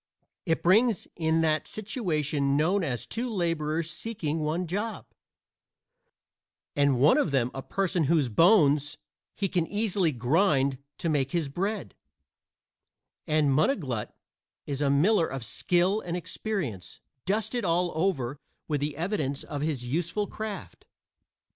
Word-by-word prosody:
It 165 - +1
brings 215 +3 +3
in 160 -1 +1
that 155 -2 +1
situation 155 - -1
known 180 +6 +2
as 125 -6 -2
two 245 +2 -3
laborers 165 -4 -1
seeking 165 -10 -3
one 155 +4 -1
job 205 +6 -3 1.7
and 140 -2 +3
one 145 +4 +5
of - - +1
them 130 -3 +1
a 135 - -5
person 180 0 0
whose 150 -2 +3
bones 145 - +4 0.4
he 200 - 0
can 175 -3 0
easily 205 -5 +1
grind 135 - +2 0.2
to - - -3
make 140 -4 0
his 165 -5 0
bread; 190 - -3 1.3
and 150 -2 +3
Munniglut 135 - 0 0.6
is 140 0 -3
a 140 - +2
miller 165 +6 +4
of 130 -2 -5
skill 185 - +1
and 175 0 -3
experience, 170 - -4 0.3
dusted 220 +4 0
all 175 0 +1
over 145 -6 -1 0.3
with 150 -3 -1
the 145 0 -2
evidence 155 -6 -2
of 145 - -5
his 145 -5 -2
useful 170 +10 -1
craft. 215 -1 -7
160 Hz, 130 wpm, -28 LUFS, 140-195 Hz, 1.7 s, one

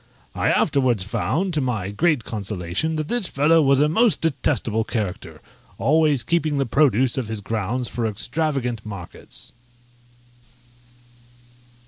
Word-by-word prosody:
I - - 0
afterwards 125 -8 +2
found, 175 - -1
to 155 - +1
my 110 -7 -2
great 150 +3 +1
consolation, 105 - -3
that 155 -1 -2
this 240 -2 0
fellow 160 +3 +3
was 135 -2 +4
a 150 - +4
most 220 +8 +2
detestable 125 -7 0
character, 90 -8 -4 0.4
always 150 -3 +3
keeping 155 +1 0
the 135 - +1
produce 130 -1 +2
of 125 - -4
his 110 -1 -3
grounds 115 +4 -2
for 115 -1 -2
extravagant 125 0 -2
markets. 100 -5 -7
130 Hz, 125 wpm, -22 LUFS, 105-155 Hz, 0.4 s, was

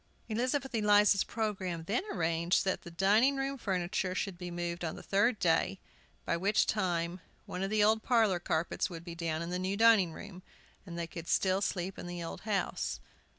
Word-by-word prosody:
Elizabeth 255 +4 -1
Eliza's 210 -2 +4
programme 190 -7 -3
then 210 - -1
arranged 170 +1 +1
that 190 - 0
the - - -10
dining 205 +10 +3
room 270 0 -2
furniture 185 -4 -2
should 195 -1 -2
be 175 0 -7
moved 175 0 -4
the 160 -2 -4
third 210 +4 +2
day, 180 +2 +2 0.5
by - - +1
which 200 +5 +2
time 175 -3 -1 0.3
one 180 - -5
of 195 - -1
the 215 0 +3
old 220 +1 +4
parlor 220 -7 +3
carpets 170 +3 -1
would 170 -2 -8
be 170 -1 -7
down 165 -1 -2
in 170 - -5
the 180 - -1
new 190 +2 -1
dining 220 -6 +5
room, 185 +2 -10 0.5
and 170 -1 -7
they 170 - -2
could 165 0 -8
still 190 0 +2
sleep 190 -1 -2
in - - -6
the 175 -1 -5
old 165 - -6
house. 200 -2 -1
185 Hz, 190 wpm, -32 LUFS, 170-210 Hz, 0.5 s, dining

